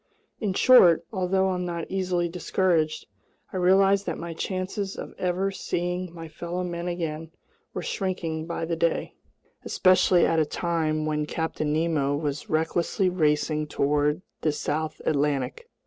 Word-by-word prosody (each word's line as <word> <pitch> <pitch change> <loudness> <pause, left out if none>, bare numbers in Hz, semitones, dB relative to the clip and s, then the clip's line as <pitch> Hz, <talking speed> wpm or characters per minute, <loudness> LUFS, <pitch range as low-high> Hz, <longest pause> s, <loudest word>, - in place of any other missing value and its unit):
In 205 -5 -1
short, 190 -11 +6
although 190 0 +1
I'm 180 -1 -1
not 170 -2 -4
easily 180 -2 0
discouraged, 170 -2 0 0.5
I - - -2
realized 195 +2 +4
that - - -2
my 170 0 -5
chances 190 +3 -3
of - - -7
ever 185 +2 0
seeing 180 -1 -3
my 165 -1 -8
fellow 170 +3 -4
men 175 0 -4
again 165 -2 -3 0.5
were - - -3
shrinking 165 -5 -3
by 170 -1 -3
the 165 0 -1
day, 165 0 0 0.5
especially 185 -1 +4
at 165 - +2
a - - +5
time 155 -3 -1
when 150 -1 -1
Captain 160 -2 -2
Nemo 150 -3 +1
was 145 -1 -3
recklessly 170 +4 +1
racing 150 -2 +1
toward 150 +3 +1 0.2
the 155 - +2
south 155 +1 -3
Atlantic! 145 - -1
170 Hz, 145 wpm, -26 LUFS, 155-185 Hz, 0.5 s, short